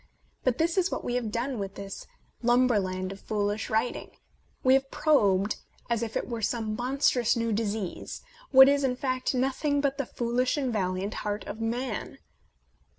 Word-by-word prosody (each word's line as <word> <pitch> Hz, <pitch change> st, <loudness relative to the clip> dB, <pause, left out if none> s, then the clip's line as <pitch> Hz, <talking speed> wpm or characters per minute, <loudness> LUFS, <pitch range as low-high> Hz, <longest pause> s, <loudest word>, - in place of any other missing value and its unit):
But 255 Hz, -2 st, +1 dB
this 335 Hz, +4 st, +2 dB
is 370 Hz, +1 st, +2 dB
what -, -, -3 dB
we 245 Hz, -, -2 dB
have 245 Hz, -3 st, -1 dB
done 240 Hz, +2 st, -2 dB
with 195 Hz, -1 st, -5 dB
this 200 Hz, 0 st, -7 dB, 0.3 s
lumberland 210 Hz, -7 st, +2 dB
of 195 Hz, -, -8 dB
foolish 205 Hz, +1 st, -2 dB
writing: 225 Hz, +3 st, -1 dB, 0.5 s
we 260 Hz, -, +5 dB
have 270 Hz, 0 st, +2 dB
probed, 205 Hz, -12 st, +2 dB, 0.3 s
as 235 Hz, -1 st, +1 dB
if 230 Hz, -2 st, -2 dB
it -, -, -3 dB
were 235 Hz, -2 st, -4 dB
some 220 Hz, -1 st, -1 dB
monstrous 250 Hz, -1 st, +2 dB
new 230 Hz, -1 st, 0 dB
disease, 210 Hz, -3 st, -3 dB, 0.3 s
what 265 Hz, 0 st, +9 dB
is, 285 Hz, 0 st, +3 dB
in 255 Hz, -2 st, +1 dB
fact, 255 Hz, -1 st, -1 dB
nothing 270 Hz, +3 st, +1 dB
but 280 Hz, 0 st, 0 dB
the 275 Hz, -, -1 dB
foolish 245 Hz, +3 st, 0 dB
and 265 Hz, -4 st, -1 dB
valiant 190 Hz, 0 st, -1 dB
heart 205 Hz, 0 st, -3 dB
of 220 Hz, +2 st, -6 dB
man. 235 Hz, -1 st, -3 dB
235 Hz, 170 wpm, -28 LUFS, 210-265 Hz, 0.5 s, what